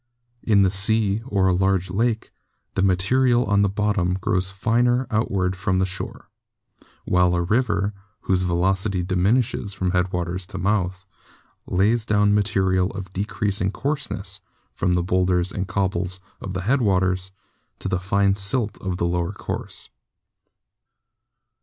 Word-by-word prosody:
In 100 Hz, -3 st, +4 dB
the 95 Hz, -, +3 dB
sea, 105 Hz, +2 st, 0 dB
or 100 Hz, -5 st, +2 dB
a 95 Hz, -, +3 dB
large 95 Hz, 0 st, +1 dB
lake, 115 Hz, +3 st, 0 dB, 0.4 s
the -, -, 0 dB
material 120 Hz, +7 st, +3 dB
on 100 Hz, 0 st, +3 dB
the 100 Hz, -, +3 dB
bottom 100 Hz, -3 st, 0 dB
grows 95 Hz, 0 st, 0 dB
finer 120 Hz, +6 st, +1 dB
outward 95 Hz, -4 st, 0 dB
from 95 Hz, 0 st, 0 dB
the 95 Hz, -, +2 dB
shore, 95 Hz, 0 st, -7 dB, 0.7 s
while 90 Hz, -1 st, +3 dB
a 85 Hz, -, +1 dB
river, 105 Hz, 0 st, +1 dB, 0.3 s
whose 95 Hz, -1 st, +1 dB
velocity 95 Hz, +2 st, 0 dB
diminishes 100 Hz, +3 st, 0 dB
from 90 Hz, -1 st, -1 dB
headwaters 90 Hz, 0 st, -1 dB
to 95 Hz, -, -7 dB
mouth, 95 Hz, -1 st, -1 dB, 0.6 s
lays 105 Hz, +5 st, +2 dB
down 105 Hz, -1 st, +3 dB
material 95 Hz, -2 st, +2 dB
of 95 Hz, -2 st, -7 dB
decreasing 100 Hz, -1 st, -1 dB
coarseness, 145 Hz, +6 st, -4 dB, 0.3 s
from 90 Hz, -, 0 dB
the 90 Hz, -, +1 dB
boulders 90 Hz, 0 st, +1 dB
and 95 Hz, -1 st, -3 dB
cobbles 95 Hz, -1 st, -1 dB, 0.2 s
of 95 Hz, -1 st, -5 dB
the 90 Hz, -, -2 dB
headwaters 95 Hz, -5 st, +1 dB, 0.5 s
to -, -, -6 dB
the 95 Hz, -1 st, 0 dB
fine 100 Hz, +1 st, +2 dB
silt 105 Hz, +3 st, 0 dB
of 95 Hz, -2 st, -3 dB
the 85 Hz, -, 0 dB
lower 85 Hz, 0 st, -1 dB
course. -, -, -6 dB
95 Hz, 140 wpm, -23 LUFS, 90-105 Hz, 0.7 s, In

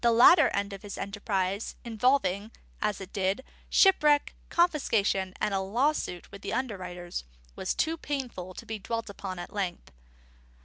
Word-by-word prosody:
The 235 Hz, -, +5 dB
latter 260 Hz, +6 st, +8 dB
end 200 Hz, 0 st, -1 dB
of 195 Hz, -, -8 dB
this 205 Hz, -1 st, -7 dB
enterprise, 200 Hz, 0 st, -2 dB
involving 220 Hz, -4 st, +2 dB, 0.3 s
(as 210 Hz, -2 st, 0 dB
it 190 Hz, -1 st, -9 dB
did) 195 Hz, +5 st, 0 dB, 0.3 s
shipwreck, 300 Hz, -7 st, +5 dB, 0.2 s
confiscation, 220 Hz, -, +2 dB
and 205 Hz, -, 0 dB
a 195 Hz, -, +2 dB
lawsuit 210 Hz, -, -1 dB
with 200 Hz, 0 st, -10 dB
the -, -, -4 dB
underwriters, 180 Hz, -, -4 dB, 0.3 s
was -, -, -2 dB
too 325 Hz, +1 st, +1 dB
painful 250 Hz, -, -4 dB
to -, -, -8 dB
be 220 Hz, -1 st, -4 dB
dwelt 230 Hz, +1 st, -3 dB
upon 190 Hz, -2 st, -6 dB
at 175 Hz, -, -7 dB
length. 190 Hz, -4 st, -3 dB
205 Hz, 150 wpm, -29 LUFS, 190-255 Hz, 0.3 s, latter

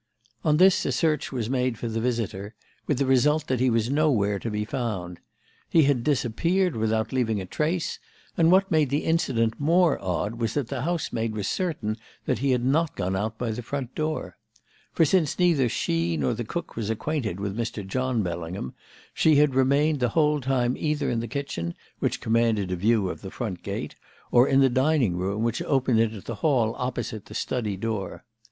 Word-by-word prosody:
"On 150 Hz, -1 st, +3 dB
this 185 Hz, +2 st, +5 dB
a -, -, +1 dB
search 155 Hz, -2 st, 0 dB
was 120 Hz, -5 st, -2 dB
made 125 Hz, -2 st, 0 dB
for 120 Hz, -, -4 dB
the 115 Hz, 0 st, -2 dB
visitor, 110 Hz, -4 st, -2 dB, 0.3 s
with 145 Hz, -, +1 dB
the 140 Hz, -, +1 dB
result 150 Hz, +4 st, +3 dB
that 130 Hz, -4 st, -1 dB
he 130 Hz, 0 st, +3 dB
was 115 Hz, +1 st, +1 dB
nowhere 120 Hz, -10 st, +2 dB
to 115 Hz, -, -4 dB
be 105 Hz, 0 st, -2 dB
found. 105 Hz, -8 st, -4 dB, 0.5 s
He 165 Hz, -, +5 dB
had 135 Hz, -4 st, +2 dB
disappeared 155 Hz, -, +1 dB
without 110 Hz, +2 st, 0 dB
leaving 115 Hz, -5 st, +1 dB
a 95 Hz, -, -5 dB
trace, 160 Hz, -, -2 dB, 0.4 s
and 165 Hz, -1 st, +4 dB
what 190 Hz, +1 st, +4 dB
made 155 Hz, -4 st, +3 dB
the 145 Hz, +3 st, 0 dB
incident 120 Hz, -9 st, +1 dB
more 165 Hz, -, +3 dB
odd 100 Hz, +5 st, -2 dB
was 115 Hz, -2 st, -1 dB
that 140 Hz, -5 st, -1 dB
the 135 Hz, -3 st, -3 dB
housemaid 125 Hz, -8 st, -2 dB
was 100 Hz, -2 st, -2 dB
certain 150 Hz, -, -2 dB, 0.3 s
that 125 Hz, -, 0 dB
he 135 Hz, +2 st, 0 dB
had 125 Hz, -1 st, +1 dB
not 155 Hz, +4 st, +1 dB
gone 95 Hz, 0 st, -1 dB
out 110 Hz, +3 st, -2 dB
by 120 Hz, -1 st, -2 dB
the 115 Hz, +3 st, -4 dB
front 130 Hz, +1 st, -5 dB
door. 155 Hz, -, -3 dB, 0.5 s
For 165 Hz, -, +3 dB
since 160 Hz, -3 st, +2 dB
neither 165 Hz, -9 st, +3 dB
she 85 Hz, -7 st, 0 dB
nor 70 Hz, -4 st, 0 dB
the 120 Hz, +1 st, -4 dB
cook 170 Hz, +9 st, -5 dB
was 110 Hz, -2 st, -3 dB
acquainted 110 Hz, -, -2 dB
with 100 Hz, 0 st, -3 dB
Mr. 115 Hz, -3 st, -3 dB
John 125 Hz, +2 st, -1 dB
Bellingham, 85 Hz, -4 st, -4 dB, 0.4 s
she 155 Hz, -1 st, +4 dB
had 145 Hz, -1 st, +4 dB
remained 140 Hz, +3 st, +3 dB
the 125 Hz, -1 st, +1 dB
whole 150 Hz, -2 st, +3 dB
time 125 Hz, -1 st, +1 dB
either 150 Hz, -3 st, -1 dB
in 115 Hz, -, 0 dB
the 115 Hz, -, -3 dB
kitchen, 115 Hz, -, -4 dB, 0.2 s
which -, -, -1 dB
commanded 110 Hz, -4 st, +1 dB
a -, -, 0 dB
view 105 Hz, +2 st, +2 dB
of -, -, -5 dB
the 95 Hz, -, -7 dB
front 100 Hz, -5 st, -5 dB
gate, -, -, -5 dB, 0.4 s
or 125 Hz, +2 st, +6 dB
in 135 Hz, 0 st, +4 dB
the 135 Hz, -, +6 dB
dining 130 Hz, -, +2 dB
room, 100 Hz, +4 st, -2 dB
which 115 Hz, 0 st, -1 dB
opened 130 Hz, -4 st, +2 dB
into 110 Hz, -3 st, 0 dB
the 115 Hz, -, -6 dB
hall 125 Hz, -8 st, +2 dB
opposite 120 Hz, -4 st, -3 dB
the -, -, -10 dB
study 110 Hz, -6 st, -2 dB
door. 105 Hz, -1 st, -4 dB
120 Hz, 200 wpm, -25 LUFS, 110-145 Hz, 0.5 s, or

